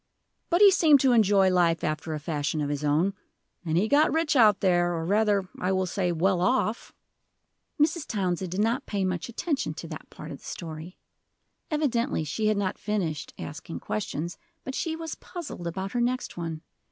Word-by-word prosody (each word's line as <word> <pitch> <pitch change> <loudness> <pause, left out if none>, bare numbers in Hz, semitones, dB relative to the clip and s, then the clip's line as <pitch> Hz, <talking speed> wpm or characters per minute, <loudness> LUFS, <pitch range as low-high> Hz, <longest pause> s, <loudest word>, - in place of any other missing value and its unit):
But 345 +2 +2
he 405 -1 +9
seemed 315 -6 +6
to 265 - +4
enjoy 200 -5 +4
life 170 -2 +2
after 155 +1 -2
a - - -4
fashion 150 0 -2
of 145 -1 -1
his 145 0 -3
own. 155 +7 +2 0.5
And 165 -2 0
he 200 +5 +2
got 290 +5 +4
rich 320 -1 +1
out 215 -6 +6
there, 175 -2 +2
or 165 -1 -3
rather, 205 0 +2
I 185 - 0
will 190 0 +1
say, 180 -1 -1
well 175 +2 +1
off." 235 +1 0 0.9
Mrs. 305 +1 +2
Townsend 185 -3 -1
did 190 +3 0
not 235 +5 0
pay 200 -2 -1
much 185 +3 -2
attention 285 +5 -2
to - - -7
that - - -8
part - - -9
of - - -8
the - - -22
story. 165 +1 -7 0.7
Evidently 275 - 0
she 215 +9 -1
had 215 -1 +2
not 195 -2 -1
finished 180 -8 -3
asking 160 +3 -7
questions, 175 -5 -4 0.2
but 265 - -5
she 320 +3 -2
was 325 0 -5
puzzled 310 - -7
about 190 +3 -4
her 240 - 0
next 250 +1 -1
one. 165 -2 -5
195 Hz, 190 wpm, -27 LUFS, 170-245 Hz, 0.9 s, he